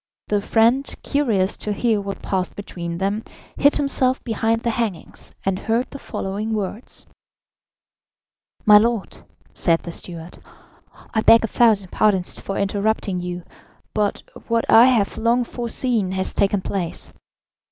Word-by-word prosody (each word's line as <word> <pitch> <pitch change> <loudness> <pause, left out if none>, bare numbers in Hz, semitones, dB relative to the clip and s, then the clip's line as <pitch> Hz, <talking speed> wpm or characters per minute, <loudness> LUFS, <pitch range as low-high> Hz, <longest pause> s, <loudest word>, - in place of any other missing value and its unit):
The 205 -1 +1
friend, 235 +6 +2
curious 220 -10 +1
to 210 - -3
hear 220 0 +1
what 200 0 -6
passed 185 -2 -2
between 170 -4 -6
them, 200 +4 -1 0.3
hid 285 +1 +4
himself 265 -2 +1
behind 225 0 0
the 235 - +1
hangings, 220 -6 -5
and 190 -1 0
heard 230 +3 -1
the 280 - -8
following 210 +1 -4
words: 210 +3 -5 1.6
"My 210 -1 +9
lord," 230 -2 -1 0.4
said 165 -2 +1
the 170 - -6
steward, 170 0 -6 0.7
"I 220 - +2
beg 230 +1 +6
a - - 0
thousand 210 -6 +3
pardons 195 -4 +1
for 195 - -5
interrupting 200 -1 0
you, 175 0 -5 0.5
but 210 -1 -1 0.2
what 230 -1 +1
I 230 +2 +8
have 230 -6 +1
long 235 +2 +2
foreseen 235 -4 -1
has 190 0 -2
taken 200 -1 +1
place. 180 -4 -4
210 Hz, 140 wpm, -21 LUFS, 190-230 Hz, 1.6 s, My